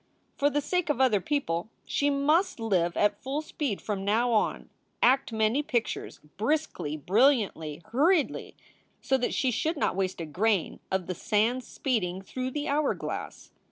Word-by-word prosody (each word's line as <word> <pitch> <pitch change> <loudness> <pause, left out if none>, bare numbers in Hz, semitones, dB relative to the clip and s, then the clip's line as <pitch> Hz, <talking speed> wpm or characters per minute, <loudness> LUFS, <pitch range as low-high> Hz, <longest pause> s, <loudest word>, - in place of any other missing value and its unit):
For 285 - +2
the 290 +1 0
sake 360 +2 -1
of 295 - +1
other 240 -7 +4
people 215 - -1 0.2
she 285 - +1
must 300 +5 +2
live 180 -6 +1
at 205 0 +2
full 280 +4 -3
speed 285 -9 -3
from 200 -3 -3
now 225 +5 +2
on, 220 - +1 0.4
act 260 0 +4
many 220 +5 +2
pictures, 240 -6 -2 0.2
briskly, 220 - -1
brilliantly, 185 - +2
hurriedly, 310 +6 +2 0.4
so 265 - +1
that 245 - -1
she 265 -4 +1
should 315 +7 -1
not - - 0
waste 190 -1 -1
a 165 - -3
grain 190 +4 0
of 190 -1 -1
the 185 - -3
sand 225 +7 +1
speeding 195 -11 -2
tlirough 255 +5 -4
the 295 0 -2
hour 290 +1 +1
glass. - - -6
235 Hz, 160 wpm, -28 LUFS, 195-285 Hz, 0.4 s, other